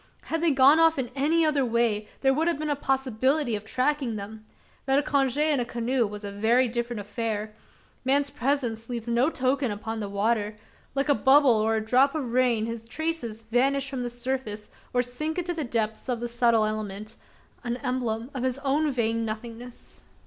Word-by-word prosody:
Had 325 0 -2
they 335 - +4
gone 275 +2 +6
off 325 -1 +5
in 255 -3 -2
any 315 +4 +2
other 295 -3 +2
way, 230 -3 0
there 270 -1 +4
would 315 +4 0
have 340 - +1
been 305 0 -2
a - - +1
possibility 265 -1 0
of 205 - -5
tracking 255 +1 0
them. 215 +1 -8 0.4
But 270 0 +3
a 290 - +2
conge 275 -2 +1
in 300 -2 +2
a - - +1
canoe 235 0 0
was 210 +1 -8
a 200 - -5
very 230 +5 +3
different 235 -1 -3
affair: 215 0 -3 0.5
man's 280 +2 +2
presence 245 -5 -1
leaves 235 -2 -4
no 240 +5 +2
token 260 -2 0
upon 220 +2 -4
the 205 -2 -4
water: 210 +1 0 0.4
like 275 +1 0
a 290 - +5
bubble 275 -1 +5
or 220 0 +1
a 220 0 -2
drop 260 +6 +3
of 260 -7 -3
rain, 245 -3 +2
his 230 0 -6
traces 245 -6 -3
vanish 265 +5 +1
from 260 -2 -3
the 245 - -2
surface, 240 -3 -4 0.2
or 245 0 +2
sink 305 +7 -4
into 355 0 -1
the 320 -2 -3
depths 225 -1 -2
of 245 -2 0
the 240 - -3
subtle 235 -2 +3
element 215 0 -4 0.5
an 240 -1 -2
emblem 245 -1 -2
of 260 - -4
his 260 0 -1
own 290 +2 +1
vain 230 -2 0
nothingness! 230 +2 -7
245 Hz, 195 wpm, -26 LUFS, 225-275 Hz, 0.5 s, gone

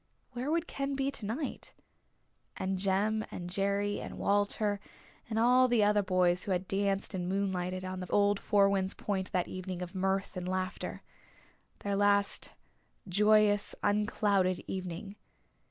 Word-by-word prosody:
Where 250 +3 -3
would 335 +1 +1
Ken 275 -2 -3
be 270 0 0
tonight? 240 +5 -4 0.8
And 190 0 -2
Jem 205 +3 +1
and 175 0 -6
Jerry 200 +1 0
and - - -7
Walter 205 0 +1 0.5
and 220 - -2
all 250 +3 +5
the 240 -3 +3
other 205 0 +4
boys 180 -2 +2
who 205 - -4
had 185 0 0
danced 195 +1 0
and 180 -1 -2
moonlighted 185 -1 -1
on 185 0 -4
the 180 - -6
old 205 0 +3
Four 200 -2 +4
Winds 195 -1 0
Point 190 -2 -3
that 180 -1 0
evening 185 -1 -5
of 180 +1 -8
mirth 195 +1 -1
and 180 0 -4
laughter 185 0 -3 0.8
their 200 -1 -1
last 200 0 +2 0.6
joyous 210 +1 +3
unclouded 205 -3 +1
evening. 190 +2 -5
200 Hz, 145 wpm, -31 LUFS, 185-210 Hz, 0.8 s, all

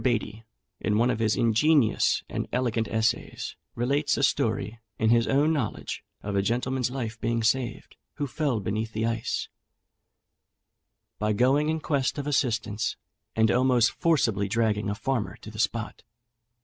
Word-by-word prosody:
Beattie, 115 -3 -1 0.4
in 105 -1 0
one 120 +3 +3
of - - -2
his 110 -1 +1
ingenious 115 +1 +3
and - - -3
elegant 120 -3 0
essays, 110 0 -1 0.2
relates 140 +5 +1
a 140 - 0
story, 115 -3 0 0.2
in 110 0 +2
his 115 -1 +4
own 145 +4 +3
knowledge, 135 -9 -3 0.2
of 100 0 -3
a 100 - +3
gentleman's 125 +4 0
life 115 -4 -5
being 115 0 0
saved, 120 +2 -1 0.2
who 145 - -2
fell 140 -4 -1
beneath 110 +3 -3
the 110 +1 -1
ice, 115 -1 -2 1.7
by 105 - 0
his 105 - +2
dog's - - -4
going 140 +4 +4
in 160 0 0
quest 140 -3 0
of 145 - -3
assistance, 115 -7 0 0.4
and 110 0 +4
almost 125 -2 +4
forcibly 115 - +1
dragging 105 -1 0
a 100 - -1
farmer 120 -1 -2
to 110 - -11
the 110 - -10
spot. 115 -1 -1
115 Hz, 160 wpm, -27 LUFS, 110-130 Hz, 1.7 s, his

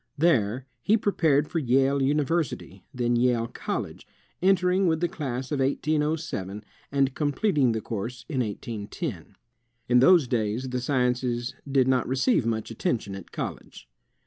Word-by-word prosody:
There 130 -6 +2 0.2
he 215 - +3
prepared 155 -9 +2
for 165 - -1
Yale 135 +1 +2
University, 140 - -1
then 120 -3 0
Yale 120 -1 +2
College, - - -5 0.3
entering 185 0 +3
with 160 -1 +2
the 175 - +1
class 135 -6 -4
of 145 - 0
1807, 145 - -1 0.3
and 140 -1 +2
completing 145 - +1
the 110 - -2
course 115 +3 -5
in 140 -5 -2
1810. 105 - -5 0.5
In 125 0 +5
those 165 +1 +6
days 115 +2 -1
the 125 0 -2
sciences 125 -2 0 0.2
did 135 -2 +3
not 130 -2 +2
receive 130 - +2
much 110 0 -2
atten 115 +2 0
tion 100 -3 -9
at 95 -2 -9
college. - - -7
130 Hz, 145 wpm, -26 LUFS, 115-150 Hz, 0.5 s, those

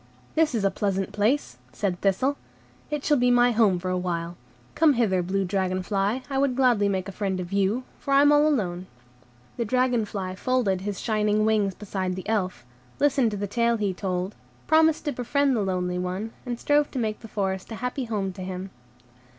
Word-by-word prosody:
"This 315 -5 +2
is 215 - 0
a 195 - +3
pleasant 195 -1 -1
place," 210 - 0
said 190 -4 -2
Thistle; 205 +9 +1 0.5
"it 300 -2 -3
shall 295 -2 +4
be 250 0 +3
my 245 0 +5
home 215 -5 +3
for 185 +1 -3
a 185 - 0
while. 170 -1 -3 0.4
Come 315 -2 +4
hither, 210 -7 +2
blue 190 +2 -1
dragon 185 0 -1
fly, 200 +6 -1
I 270 0 -1
would 275 -2 +1
gladly 240 -6 +3
make 190 -1 -1
a - - -5
friend 195 -2 -2
of 180 +1 -6
you, 200 +5 +1 0.2
for 280 - -5
I 275 - +7
am 290 - +6
all 295 +1 +5
alone." 185 -11 -1 0.7
The 235 - 0
dragon 250 0 +1
fly 190 -3 -4
folded 205 -3 0
his 200 0 -4
shining 215 -1 +1
wings 210 -3 +1
beside 190 -3 -3
the 185 - -7
Elf, 185 - -1 0.3
listened 275 -4 +3
to 205 - -4
the 205 - -2
tale 235 +3 +1
he 205 -3 -1
told, 185 +1 -3 0.3
promised 315 0 +3
to 295 - 0
befriend 275 +2 +1
the 220 - +1
lonely 180 -2 -1
one, 185 +5 -3 0.2
and 240 -1 -3
strove 290 0 +2
to - - -7
make 220 -3 -1
the 225 - -10
forest 190 -1 -3
a - - -4
happy 250 +3 -3
home 200 -4 -2
to 190 - -9
him. 185 +1 -5
210 Hz, 205 wpm, -25 LUFS, 185-250 Hz, 0.7 s, I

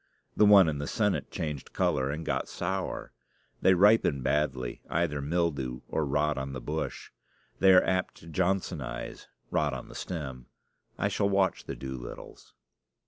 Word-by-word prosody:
The 105 - +5
one 100 -4 +8
in 75 -2 -1
the 70 - -3
Senate 105 -4 0
changed 75 -6 -5
color 65 0 +1
and 80 +3 -4
got - - -1
sour. 95 +2 -3 0.5
They 95 - +5
ripen 95 - +4
badly 65 -5 -1
either 80 -4 0
mildew 70 -5 -1
or 80 -2 -1
rot 75 +1 +1
on 65 0 -4
the 65 - -4
bush. 75 +6 -4 0.5
They 95 - +6
are 90 - +7
apt 95 0 0
to 80 - -15
Johnsonize 80 -8 -2 0.2
rot 75 -3 +1
on 60 - -8
the - - -10
stem. 65 -8 -6 0.5
I - - +1
shall 100 - +1
watch 95 -2 +1
the - - -5
Doolittles. 65 -2 -8
75 Hz, 155 wpm, -29 LUFS, 65-95 Hz, 0.5 s, one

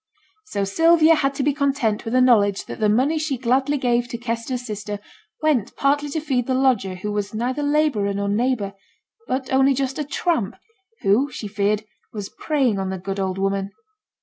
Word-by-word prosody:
So 200 - -2
Sylvia 325 - +5
had 275 -3 +1
to 275 - -1
be 290 +1 +2
content 275 -7 0
with 225 +2 -2
the 255 - +5
knowledge 205 -6 +4
that - - -8
the 215 -1 +2
money 270 +9 +2
she 305 -4 -1
gladly 265 +4 +1
gave 245 -2 +1
to 240 - -5
Kester's 240 +1 -3
sister 210 -2 -5 0.4
went 265 -9 +1
partly 290 +1 +1
to 315 - -2
feed 265 -6 -1
the 260 - +1
lodger 250 -8 +2
who 210 +3 -4
was 205 0 -3
neither 250 +6 -1
labourer 290 -9 +1
nor 200 0 -1
neighbour, 210 -1 0 0.5
but 260 0 -2
only 270 +1 +4
just 270 +1 -2
a - - 0
tramp, 290 - -1 0.5
who, 225 +9 +3
she 240 -5 -6
feared, 205 +1 0 0.3
was 205 -3 -6
preying 265 -10 0
on 190 -1 -2
the 190 - -3
good 195 +2 -5
old 190 -1 -1
woman. 195 0 -1
245 Hz, 190 wpm, -22 LUFS, 205-275 Hz, 0.5 s, Sylvia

